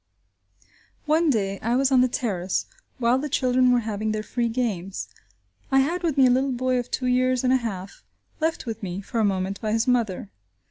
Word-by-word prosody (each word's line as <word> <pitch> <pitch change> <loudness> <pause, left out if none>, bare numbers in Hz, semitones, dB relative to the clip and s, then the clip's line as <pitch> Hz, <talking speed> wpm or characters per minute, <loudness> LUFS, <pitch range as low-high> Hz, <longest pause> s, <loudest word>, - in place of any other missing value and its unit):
One 315 +2 +3
day 195 -6 0
I 235 +3 0
was 270 +1 +2
on 260 -2 +5
the 255 - +4
terrace 195 -7 -2 0.3
while 245 0 +2
the 295 +2 -3
children 255 -1 +3
were 245 -1 +3
having 215 -1 -2
their 215 0 -3
free 235 +1 -1
games; 205 -6 -3 0.6
I 270 0 +5
had 340 +6 -1
with 325 -5 -1
me 270 - +6
a - - +5
little 260 +1 +1
boy 255 0 0
of 245 - -5
two 255 - -2
years 255 0 +2
and 255 0 +3
a - - +5
half 200 -6 -6 0.4
left 320 -2 -1
with 225 -1 -5
me, 190 -1 -4
for 230 +3 -4
a - - +3
moment, 195 -1 -1
by 215 -1 -1
his 225 +2 +1
mother. 225 -6 0
245 Hz, 205 wpm, -24 LUFS, 215-255 Hz, 0.6 s, me